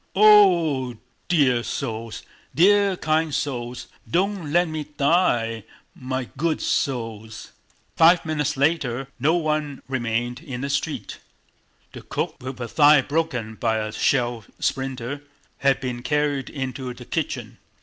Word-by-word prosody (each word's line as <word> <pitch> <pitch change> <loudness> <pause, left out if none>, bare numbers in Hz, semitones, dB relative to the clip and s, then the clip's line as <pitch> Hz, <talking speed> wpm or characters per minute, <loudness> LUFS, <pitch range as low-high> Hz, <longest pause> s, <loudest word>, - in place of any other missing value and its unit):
"Oh 180 -10 +5
h 120 - -9
h! - - -21 0.3
Dear 135 -8 +3
souls, 115 -3 -5 0.3
dear 200 +2 +4
kind 155 0 +1
souls! 125 -4 -3 0.2
Don't 185 -3 0
let 175 +2 +3
me 155 -1 -4
die! 120 - +2 0.3
My 130 -1 -4
good 160 +2 0
souls!..." 110 -4 -3 0.4
Five 165 +1 +5
minutes 150 -4 -1
later 135 -3 0
no 155 +6 +3
one 150 -4 -1
remained 120 -1 -2
in 135 -6 -7
the 140 +1 -2
street. 150 +2 -3 0.7
The - - -10
cook, - - -3
with 130 0 -6
her 125 - -4
thigh 145 +4 +5
broken 135 -8 -2
by 110 0 0
a 110 0 -3
shell 120 -1 +1
splinter, 135 +1 -3 0.4
had 135 -1 +2
been 125 -2 -4
carried 145 0 0
into 130 -2 -4
the - - -11
kitchen. - - -4
135 Hz, 135 wpm, -23 LUFS, 120-160 Hz, 0.7 s, Oh